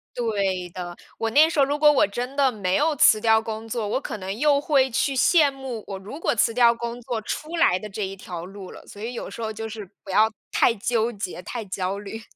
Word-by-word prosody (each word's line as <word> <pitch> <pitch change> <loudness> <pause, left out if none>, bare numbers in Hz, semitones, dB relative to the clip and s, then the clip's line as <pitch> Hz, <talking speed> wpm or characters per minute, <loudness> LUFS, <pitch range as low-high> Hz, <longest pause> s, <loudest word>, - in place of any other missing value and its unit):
对 195 -6 -1
的， 175 -1 -7 0.2
我 225 - 0
那 300 +6 +6
时 310 - -2
候 275 - +6
如 290 +1 -1
果 300 0 +6
我 265 - +3
真 245 +6 -5
的 275 -2 +3
没 190 -4 -1
有 305 0 +2
辞 215 -4 +5
掉 220 -1 +4
工 225 0 -6
作， 225 -2 -3
我 260 +6 -1
可 215 - -5
能 190 +1 -5
又 290 -1 +4
会 275 -3 +2
去 270 +3 0
羡 295 +2 +4
慕 265 -5 -7
我 195 - -5
如 215 +11 -9
果 - - +1
辞 225 +1 +2
掉 235 -1 +5
工 235 +1 -5
作 235 -3 -3
出 310 +9 -5
来 185 - +4
的 215 - -7
这 205 +1 -5
一 195 +1 -6
条 175 -3 -7
路 195 0 -10
了。 - - -13
所 205 - -12
以 235 +2 -4
有 - - -6
时 230 - -8
候 220 0 -3
就 220 +1 -6
是 215 -3 -8 0.2
不 195 - -13
要 220 +3 +4 0.2
太 235 - +3
纠 230 +2 0
结， 195 -5 -6
太 235 +2 -5
焦 190 +1 -3
虑。 210 +2 -7
225 Hz, 265 characters per minute, -24 LUFS, 200-265 Hz, 0.2 s, 那